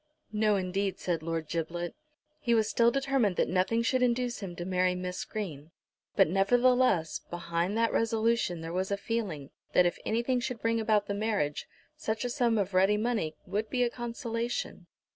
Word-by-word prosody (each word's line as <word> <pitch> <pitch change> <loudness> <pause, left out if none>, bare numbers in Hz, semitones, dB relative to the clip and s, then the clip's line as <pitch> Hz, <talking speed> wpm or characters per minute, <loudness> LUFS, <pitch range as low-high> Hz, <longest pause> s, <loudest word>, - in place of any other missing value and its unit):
"No, 215 -1 +2
indeed," 190 0 -1
said 170 -3 -2
Lord 165 -1 -3
Giblet. 170 +1 -3 0.5
He 235 -5 +2
was 220 -1 +3
still 235 +1 +4
determined 265 -6 +1
that - - +2
nothing 190 +6 +1
should 255 +2 +1
induce 245 0 +1
him 185 -4 -6
to 175 - -5
marry 185 0 +1
Miss 180 0 -4
Green; 160 -9 -6 0.5
but - - +5
nevertheless, 220 -1 +3
behind 170 +3 -2
that 230 0 +2
resolution 225 -6 +1
there 165 +1 -5
was 185 +1 -1
a 200 - 0
feeling, 200 -10 -3 0.2
that 180 - +6
if 175 - 0
anything 240 +3 +1
should 245 -1 -3
bring 230 0 +1
about 215 -2 +2
the 200 - -2
marriage, 200 -9 -1 0.3
such 220 +1 -2
a 245 - -1
sum 240 -4 +2
of 200 -1 -1
ready 195 +3 +4
money 215 -8 -1
would 210 +3 -2
be 250 -1 +1
a 240 - +1
consolation. 235 -5 -4
210 Hz, 180 wpm, -30 LUFS, 180-235 Hz, 0.5 s, that